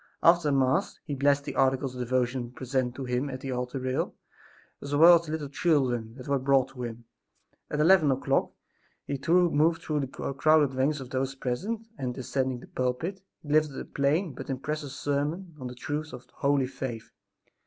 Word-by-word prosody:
After 170 -3 +5
Mass 135 -1 +1
he 145 - -4
blessed 140 +1 +2
the - - -5
articles 130 0 +2
of 125 - -8
devotion 125 0 0
presented 130 -1 -2
to 135 - -5
him 125 +3 -1
at 130 -1 -6
the 135 - -4
altar 125 +1 -3
rail, 130 0 -2 0.7
as 140 0 -3
well 170 +3 +8
as 170 - -12
the - - -5
little 155 -2 -3
children 130 -7 0
that 130 -1 -10
were 140 -1 +1
brought 135 0 +3
to 135 -2 -10
him. 120 -1 -6 0.6
At 150 - -2
eleven 160 -1 +5
o'clock 135 0 +1 0.6
he 140 - -3
moved 165 -2 +3
through 150 -1 -1
the 135 - -1
crowded 145 +2 +2
ranks 135 +3 0
of 130 - -9
those 135 +1 -1
present 195 - -3
and, 125 -2 -3
ascending 130 -1 -2
the - - -12
pulpit, 130 +10 -2 0.2
he 150 - -10
delivered 150 -2 +2
a - - -6
plain 145 +4 0
but - - -8
impressive 145 +2 -3
sermon 145 +6 -2
on 130 - -5
the 125 - -8
truths 150 +5 -4
of 125 - -9
holy 140 -1 +2
faith. 130 -3 -6
135 Hz, 185 wpm, -28 LUFS, 130-150 Hz, 0.7 s, well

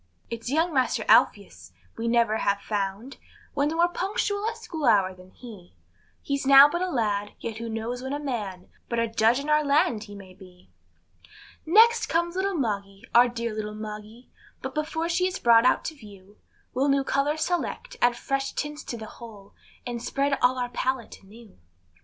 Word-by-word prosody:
It's 230 +1 -5
young 325 +4 +1
master 260 -2 0
Alpheus - - +2 0.2
we 230 +1 -4
never 230 -2 +2
have 200 -2 0
found 205 +5 -4 0.4
One 285 0 +1
more 335 +2 +2
punctual 405 +3 -2
at 460 - -7
school 340 -10 -5
hour 200 -5 +3
than 185 0 -16
he; 200 - -13 0.5
He's 280 -1 -2
now 275 +1 +9
but 345 +4 -3
a 370 - -1
lad, 205 - -1
yet 225 -2 -5
who 230 0 -5
knows 225 +3 -4
when 265 +1 -5
a 290 - -1
man, 210 -10 -5 0.2
But 235 - -2
a 230 0 +1
Judge 225 +2 +2
in 285 - -6
our 300 0 +3
land 280 -7 +1
he 205 -1 -11
may 190 -2 -12
be. 180 -1 -18 1.0
Next 455 +7 +5
comes 340 +1 0
little 385 +1 -1
Moggy, 200 -7 -3
our 240 +1 +6
dear 235 -1 -4
little 210 0 -5
Moggy, 215 +2 -9 0.3
But - - -5
before 320 +2 -2
she 355 +2 +1
is 370 - -4
brought 230 0 +5
out - - +2
to 320 - -3
view, 205 -5 -16 0.3
We'll 270 +3 +1
new 275 0 +2
colors 290 +3 0
select, 355 +8 -3
add 240 0 +3
fresh 275 +1 -2
tints 295 0 -4
to 235 - -5
the 220 - -8
whole, 215 -3 -13 0.3
And 240 -2 -4
spread 275 +3 0
all 250 +1 +3
on 250 - 0
our 245 - -4
pallet 255 0 -3
anew. 210 - -17
245 Hz, 190 wpm, -26 LUFS, 215-295 Hz, 1.0 s, now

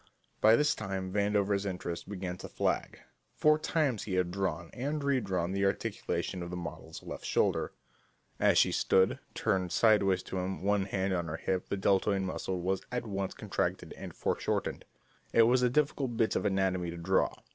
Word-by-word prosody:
By 110 +1 +7
this 150 +3 +3
time 95 -2 -4
Vandover's 100 -1 +1
interest 90 -3 -4
began 95 -3 -4
to - - -8
flag. - - -1 0.3
Four 155 0 +4
times 145 -8 0
he 95 - -2
had 90 -1 +1
drawn 95 -3 -2
and 145 +5 -2
redrawn 100 -11 0
the 100 +1 0
articulation 100 -2 -1
of 85 - -5
the 90 - -5
model's 85 -3 -7
left - - -7
shoulder. - - +1 0.7
As - - +4
she - - +5
stood, 95 0 +3 0.2
turned 90 -2 0
sideways 100 -5 +4
to 95 - -4
him, 95 +1 -3
one 100 -1 +2
hand 95 0 -1
on 85 -2 -1
her 80 +1 -3
hip, 95 +1 -2
the 100 - -1
deltoid 95 0 +2
muscle 95 0 -3
was 95 +2 0
at 125 -1 -2
once 100 -3 -3
contracted - - -2
and - - -8
foreshortened. - - -1 0.5
It 115 - +7
was 125 +2 +4
a 125 - +4
difficult 140 -3 0
bit 115 -1 +2
of - - 0
anatomy 95 -3 +1
to 85 - -6
draw. 95 +3 +1
95 Hz, 180 wpm, -31 LUFS, 95-110 Hz, 0.7 s, By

